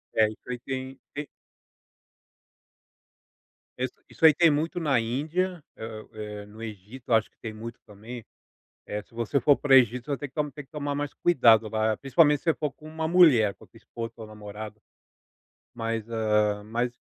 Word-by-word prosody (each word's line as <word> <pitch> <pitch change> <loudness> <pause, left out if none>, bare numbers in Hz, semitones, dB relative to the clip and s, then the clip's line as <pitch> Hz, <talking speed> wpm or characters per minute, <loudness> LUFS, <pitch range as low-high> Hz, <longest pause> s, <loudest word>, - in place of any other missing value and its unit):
É, 110 -1 +5
isso 110 - -12
aí 125 -1 -4
tem, 130 +1 -5 0.2
te 145 0 -4 2.5
Isso 130 0 -2 0.2
isso - - +1
aí 155 - +9
tem 165 +2 +5
muito 160 +5 -1
na 145 -7 +2
Índia, 155 +9 -1
eh 110 -1 -7
eh, 105 -1 -7
no 105 +2 -13
Egito 110 +3 -9
eu - - +7
acho 110 - +2
que - - -43
tem 110 -2 -5
muito 115 +2 -8
também, 110 +3 -9 0.6
eh, 105 - -4
se 100 - -26
você 115 +4 0
for 140 +3 +5
para 145 - -3
o - - +9
Egito 125 -1 +5
você 140 - 0
tem 145 - -6
que 150 +1 -2
tem 150 - -9
que - - -41
tomar 145 -1 -3
mais 145 0 -3
cuidado 115 -9 +5
lá, 110 0 0
principalmente 145 +2 +4
se - - -28
você 165 - +4
for 150 -2 -3
com 155 - -14
uma 160 0 -3
mulher, 150 - +6
com - - -18
a - - -16
tua - - -19
esposa, 115 -1 -7
sua 115 -2 -10
namorada. 105 0 -9 1.0
Mas, 115 -1 -3
ah 105 -2 +1
mas 120 +3 -1
120 Hz, 190 wpm, -27 LUFS, 110-145 Hz, 2.5 s, aí